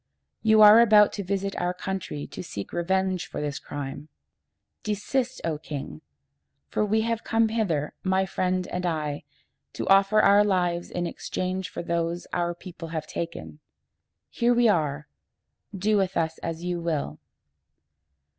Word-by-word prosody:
You 220 -1 +6
are 210 +2 +10
about 215 -3 +6
to 200 - -4
visit 195 +1 -2
our 180 +1 -1
country 180 -6 -4
to - - -8
seek 105 - -7
revenge 185 +1 0
for - - -6
this 145 -1 -3
crime. 145 +1 -7 0.7
Desist, 245 +5 -2
O 160 -3 -1
king! 140 - -7 0.7
for - - 0
we 215 +1 +2
have 230 0 -1
come 225 -1 +2
hither, 175 -10 -1
my 190 0 +1
friend 185 -1 -1
and 180 - -3
I, 155 -4 -2 0.5
to - - -4
offer 195 +2 +5
our 205 0 +6
lives 180 -4 0
in 175 0 -3
exchange 185 +1 -3
for - - -6
those 170 0 -2
our 175 -1 0
people 170 -2 -9
have 160 -1 -4
taken. 80 - -6 0.7
Here 240 +1 +2
we 240 0 +4
are! 150 -7 0 0.6
Do 210 +2 +1
with 190 -1 0
us 160 -1 -1
as 165 0 -5
you 175 -1 -2
will." 150 - -2
180 Hz, 150 wpm, -26 LUFS, 165-205 Hz, 0.7 s, are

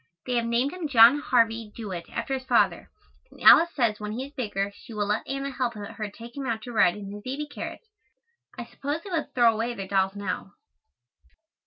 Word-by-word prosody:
They 250 - -2
have 235 - 0
named 240 +6 +1
him 360 -4 -4
John 245 +1 +7
Harvey 230 -5 +1
Jewett 190 -7 -6
after 235 +3 -3
his 260 -1 -3
father, - - +2 0.4
and - - -18
Alice 340 - +8
says 230 -6 +1
when 210 0 -5
he 255 +4 -4
is 280 - -14
bigger 205 -6 -2
she 225 - -12
will 210 -1 0
let 210 +1 -1
Anna 275 +1 -3
help 250 -3 -2
her 210 0 -6
take 235 +3 -12
him 275 -2 -4
out 225 -2 -2
to 245 - -8
ride 200 -5 +4
in 200 -1 -8
his 205 0 -8
baby 270 +6 -4
carriage. 295 - -7 0.7
I 240 - -5
suppose 285 +6 -5
they 395 - -9
will 330 -3 0
throw 235 -2 +5
away 230 +2 -2
their 195 -3 -6
dolls 195 0 +1
now. 195 0 -4
235 Hz, 210 wpm, -26 LUFS, 210-265 Hz, 0.7 s, Alice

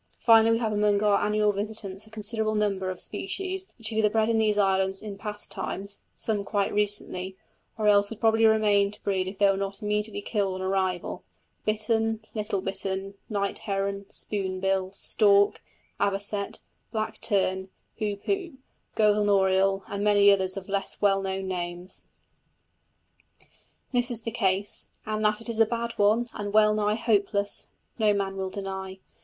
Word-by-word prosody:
Finally, 225 -1 +6
we - - +3
have 225 -2 -1
among 205 0 +2
our 205 -1 +3
annual 210 0 +2
visitants 205 -1 -5
a - - -16
considerable 220 0 -1
number 200 -3 0
of 185 - -5
species 380 - -3
which 225 -3 +2
have 220 -1 -1
either 215 -1 +4
bred 220 +1 +1
in 225 -1 +2
these 215 -1 +2
islands 190 -1 +2
in 210 -2 -7
past 210 0 -5
times 200 +1 -4
(some 210 -3 -1
quite 200 -1 -1
recently), 200 -2 -1 0.4
or 215 - -1
else 205 -1 +5
would 225 - -8
probably 225 0 +4
remain 210 -2 +4
to 210 +1 -8
breed 190 -2 0
if 190 +1 -6
they 205 - +4
were 195 -1 +4
not 195 +2 -4
immediately 210 0 -1
killed 200 -2 -1
on 185 - -5
arrival 190 -2 -1 0.4
bittern, 220 +1 +1
little 210 -3 -2
bittern, 195 0 -3 0.2
night 200 -2 -1
heron, 200 -1 -3
spoonbill, 190 -1 -1
stork, 200 0 +3 0.4
avocet, 200 0 -1 0.3
black 220 -1 -3
tern, 190 -2 0 0.3
hoopoe, 300 - -2 0.4
golden 210 -1 +3
oriole, 195 0 +3
and 200 0 -3
many 205 -1 +6
others 190 -1 +1
of 190 - -6
less 195 -1 -2
well 195 -1 +3
known 190 0 -3
names. 175 0 -5 1.8
This 245 -1 +1
is 230 -2 -3
the 230 - -3
case, 200 -3 0 0.2
and 215 0 -2
that 210 +1 +2
it 230 - -6
is 230 -1 -3
a 225 - +7
bad 235 0 -2
one, 215 +4 +3
and 205 -1 -4
well 215 0 +5
nigh 210 0 +1
hopeless, 205 -3 0 0.3
no 210 -2 +4
man 195 -1 -2
will 190 -1 -3
deny. 190 -1 -5
205 Hz, 165 wpm, -27 LUFS, 195-215 Hz, 1.8 s, a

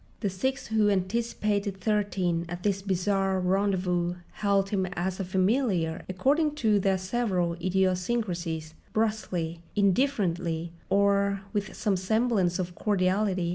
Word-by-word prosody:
The 200 -4 0
six 260 +9 -2
who 220 -1 +3
had 200 -1 +3
anticipated 205 0 -1
Thirteen 190 -4 0
at 175 +1 -6
this 195 -2 +1
bizarre 195 0 +1
rendezvous 180 -2 +1 0.3
hailed 200 -1 +2
him 190 -3 +1
as 180 +2 -2
a - - 0
familiar, 185 -3 +1
according 290 - +1
to 220 -7 +2
their 195 0 +2
several 185 -3 0
idiosyncrasies, 180 -3 -1 0.2
brusquely, 185 -7 -1 0.2
indifferently, 185 - +1 0.2
or 200 0 +2
with 205 -1 -2
some 210 -2 +1
semblance 195 -2 +1
of 180 -1 -3
cordiality. 190 -2 +1
195 Hz, 125 wpm, -28 LUFS, 180-210 Hz, 0.3 s, who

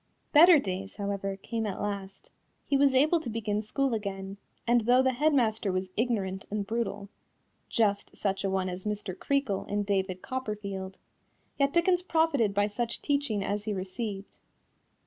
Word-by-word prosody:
Better 330 +2 +9
days, 195 -5 -3
however, 200 -1 -3
came 225 +2 -3
at 195 - -4
last. 200 -1 -5 0.3
He 280 - +1
was 275 -1 +4
able 310 +6 +4
to 275 - -6
begin 215 -2 -1
school 265 +4 0
again, 195 -2 -4 0.3
and 240 0 +4
though 245 +3 +4
the 260 0 +2
head 300 +5 +2
master 220 -7 +1
was 185 0 -2
ignorant 200 -5 -1
and 205 -1 -2
brutal 205 -2 -3 0.6
(just 205 -3 0
such 195 -1 -1
a 195 - +1
one 190 -1 0
as 180 0 -5
Mr. 210 -3 -3
Creakle 275 -3 -1
in 205 0 -1
David 190 -2 -1
Copperfield) 200 -6 -4 0.6
yet 280 0 +3
Dickens 350 +2 +3
profited 320 - +2
by 205 +1 +2
such 230 +3 -3
teaching 280 -8 0
as 205 +1 -2
he 215 - -1
received. 195 +1 -5
210 Hz, 165 wpm, -29 LUFS, 195-255 Hz, 0.6 s, Better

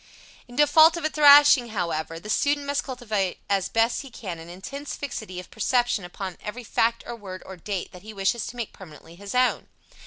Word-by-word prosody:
In 245 - -13
default 315 +3 +6
of 340 - -4
a 310 - 0
thrashing, 290 -3 +7
however, 165 -6 -3
the 205 - -11
student 285 +6 +1
must 285 0 -1
cultivate 220 -8 -2
as 195 -2 +1
best 230 +1 +1
he 275 - -11
can 190 -8 -7
an 165 +1 -11
intense 275 +11 -7
fixity 220 -9 -6
of 180 - -11
perception 240 -1 +1
upon 180 +1 -7
every 235 +4 -6
fact 230 +1 0
or 240 - -6
word 190 -4 -9
or 190 - -9
date 185 +1 -5
that 180 - -12
he 215 +3 -10
wishes 205 +3 -1
to 245 - -8
make 235 -3 -5
permanently 165 -3 -13
his 200 +5 -8
own. 255 0 +2
220 Hz, 205 wpm, -25 LUFS, 190-260 Hz, -, thrashing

